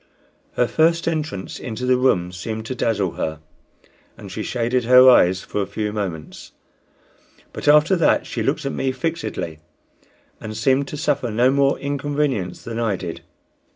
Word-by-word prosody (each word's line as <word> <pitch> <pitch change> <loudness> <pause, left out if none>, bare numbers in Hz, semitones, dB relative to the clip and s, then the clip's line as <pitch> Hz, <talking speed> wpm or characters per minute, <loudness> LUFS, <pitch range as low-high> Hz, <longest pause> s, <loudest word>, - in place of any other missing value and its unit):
Her 125 - +1
first 165 +4 +2
entrance 155 - -3
into 125 +1 -5
the 130 0 +4
room 90 -9 +1
seemed 110 +5 -5
to 130 - -4
dazzle 105 -7 0
her, 80 0 -3 0.8
and - - -10
she - - -5
shaded 120 0 -1
her 125 +1 +7
eyes 95 -7 +5
for 105 - -3
a 100 - -2
few 105 -1 -3
moments, 90 -7 -6 1.0
but - - -6
after 150 +5 +5
that 170 - +2
she - - -4
looked - - -1
at 140 - -1
me 135 - -1
fixedly, 140 - -4 0.8
and 110 0 -7
seemed 135 +4 +2
to 150 - -6
suffer 145 -4 0
no 120 +4 +3
more 140 0 +2
inconvenience 140 -8 -2
than 115 0 -5
I 110 -4 0
did. 85 -3 -6
125 Hz, 160 wpm, -21 LUFS, 105-140 Hz, 1.0 s, her